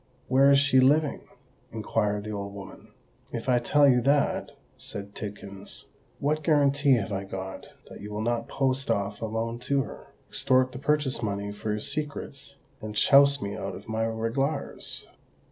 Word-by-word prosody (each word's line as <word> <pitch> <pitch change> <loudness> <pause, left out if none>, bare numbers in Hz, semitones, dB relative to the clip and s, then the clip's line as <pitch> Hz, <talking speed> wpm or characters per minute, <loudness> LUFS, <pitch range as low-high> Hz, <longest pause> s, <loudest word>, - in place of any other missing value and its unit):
"Where 135 +2 +6
is 140 - +7
she 140 -2 +4
living?" 145 +3 +3 0.5
inquired 105 0 -1
the 110 - -5
old 100 -1 -5
woman. 100 -1 -10 0.4
"If - - -5
I 125 -1 +4
tell 145 +4 +4
you 125 -2 +5
that," 140 +3 +2 0.3
said 100 0 -8
Tidkins, 100 -2 -7 0.3
"what 150 +2 0
guarantee 145 -2 +4
have 110 -3 -2
I 95 0 -2
got 95 -1 -7 0.2
that - - -11
you 105 - -7
will 105 +1 -3
not 120 0 -1
post 135 0 0
off 100 +1 -1
alone 115 +1 -2
to 135 +2 +1
her, - - -10 0.2
extort 130 0 +2
the 125 - -7
purchase 145 -2 0
money 100 -2 -2
for 105 +1 -6
your 105 0 0
secrets, 140 +1 -4 0.3
and 110 -1 -6
chouse 140 +3 +5
me 100 0 -3
out - - -5
of - - -11
my 110 0 -1
reglars? 115 +6 -2
120 Hz, 165 wpm, -27 LUFS, 105-140 Hz, 0.5 s, is